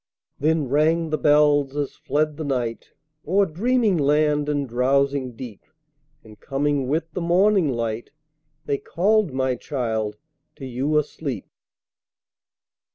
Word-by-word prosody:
Then 155 -1 +1
rang 155 +4 +2
the 155 - +1
bells 145 -2 +3
as 145 -2 -2
fled 150 +2 -1
the 160 - -4
night 125 -5 -3 0.4
O'er 195 +4 +3
dreaming 210 +2 +1
land 150 0 +2
and 145 -2 -1
drowsing 130 +1 +1
deep, 115 -3 -9 0.6
And 110 -1 -15
coming 140 -1 -1
with 160 +4 -1
the 180 - -3
morning 180 0 +3
light, 115 -2 -3 0.6
They 140 - -1
called, 205 +1 +1
my 130 0 0
child, 110 -5 -3 0.4
to 135 - -9
you 135 +4 -1
asleep. 150 -2 -3
145 Hz, 125 wpm, -23 LUFS, 130-160 Hz, 0.6 s, bells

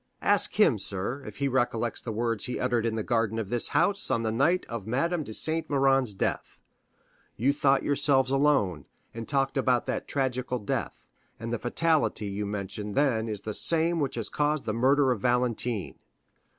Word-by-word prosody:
Ask - - +2
him, - - +5
sir, 100 +9 -3
if 105 - -9
he 140 - 0
recollects 120 -3 0
the 115 - -5
words 115 -1 -1
he 125 - -4
uttered 120 -2 0
in 110 - -2
the 110 - -2
garden 115 -1 0
of 110 -3 -4
this 120 -1 +3
house 195 +7 +1
on 120 -3 0
the 110 - 0
night 155 +11 +1
of 115 -4 -6
Madame 155 +8 0
de 110 - -9
Saint 160 +8 -1
Méran's 135 -5 +2
death. - - -3 0.8
You 135 +5 +2
thought 140 -1 +2
yourselves 135 -2 +2
alone, 135 - +1 0.3
and 115 -1 -7
talked 135 -1 0
about 130 -2 +2
that - - -3
tragical 130 -2 -1
death, 105 - -4 0.3
and 115 +1 -5
the 120 - -2
fatality 155 -3 0
you 100 +1 -3
mentioned 105 0 -5
then 120 -6 +1
is 105 -2 -3
the 110 - -5
same 165 +6 +3
which 140 -3 -1
has 115 -3 -2
caused 150 0 -1
the 110 - -1
murder 135 +3 +3
of 115 -5 -2
Valentine." 120 -3 -1
125 Hz, 185 wpm, -27 LUFS, 110-140 Hz, 0.8 s, him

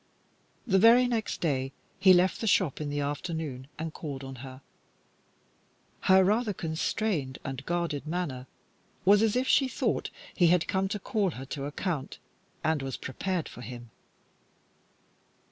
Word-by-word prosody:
The 195 -5 +3
very 235 +4 +7
next 230 -3 -2
day 135 -4 0 0.3
he 190 -1 +7
left 185 +1 +4
the 225 - -1
shop 180 -8 +2
in 150 - -3
the 145 0 -1
afternoon 145 -2 -4
and 160 0 -4
called 140 -4 -6
on 135 -1 -8
her. 130 +1 -10 1.4
Her 190 0 +5
rather 210 +3 +2
constrained 160 -3 -2
and 135 0 -5
guarded 170 -4 -2
manner 155 -7 -3 0.6
was 200 +2 +6
as 220 -1 +2
if 255 +1 +1
she 270 - +4
thought - - -1 0.3
he 175 - +5
had 175 0 +3
come 190 0 +1
to 205 - -2
call 205 -1 0
her 135 - -6
to 140 -1 -4
account, 150 0 -3 0.5
and 160 -2 +1
was 135 -1 -4
prepared 180 +5 -3
for - - -10
him. 120 -1 -9
165 Hz, 150 wpm, -29 LUFS, 135-195 Hz, 1.4 s, very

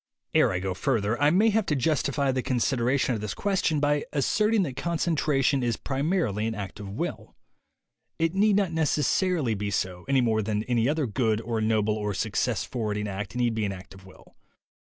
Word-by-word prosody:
Ere - - +4
I - - -1
go 95 0 -2
further 110 +2 -1
I 145 - +5
may 205 +7 +4
have 220 -1 +1
to 150 - +1
justify 140 0 +1
the 130 0 -1
con 130 0 -1
sideration 125 +1 +1
of 110 - -3
this 105 -2 -4
question 190 -6 0
by 145 0 +1
asserting 210 - +2
that 135 -7 -4
con 170 +4 -2
centration 145 -4 +1
is 120 -2 0
primarly 135 - -1
an 115 - -3
act 100 -1 -6
of 100 -2 -7
will. 100 - -5 0.8
It 165 +1 0
need 205 +1 +3
not 195 -4 +1
necessarily 160 - +1
be 105 0 -3
so, 90 -2 -3
any 135 -1 +4
more 110 -2 +1
than 105 0 -1
any 120 +1 +1
other 155 -1 0
good 110 -1 0
or 115 -1 -2
noble 110 -1 +1
or 105 -2 -3
success 110 +3 -1
forwarding 105 -4 -3
act 100 +2 -5
need 120 -2 +1
be 110 -1 -1
an 100 - -1
act 95 0 -11
of 95 0 -15
will. 95 -1 -18
125 Hz, 200 wpm, -26 LUFS, 105-150 Hz, 0.8 s, I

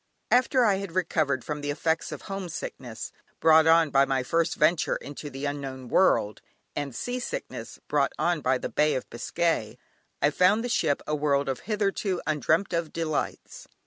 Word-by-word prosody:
After 255 0 +4
I 200 -3 +3
had 195 -3 -6
recovered 155 -8 0
from 150 -1 -4
the 145 - -3
effects 160 +2 -1
of - - -7
homesickness, 170 - -6 0.3
brought 160 0 +6
on 165 -2 +5
by 135 0 +5
my 135 -1 0
first 165 +5 0
venture 155 +2 +2
into 145 +1 -7
the 135 +1 -6
unknown 135 -3 -5
world, 105 - +3 0.3
and 140 -4 -4
sea 245 +1 -3
sickness 485 - -6
brought - - +2
on 170 -3 +1
by 130 0 +2
the - - -4
Bay 150 0 +2
of 130 - -3
Biscay, 165 -1 -1 0.4
I 145 - +3
found 185 +8 +3
the 245 - -3
ship 155 -10 +1
a 150 - -2
world 145 -2 +1
of 135 -1 -2
hitherto 200 -3 0
undreamt 155 +6 +1
of 170 -2 -1
delights. 160 -2 -3
155 Hz, 175 wpm, -27 LUFS, 140-180 Hz, 0.4 s, brought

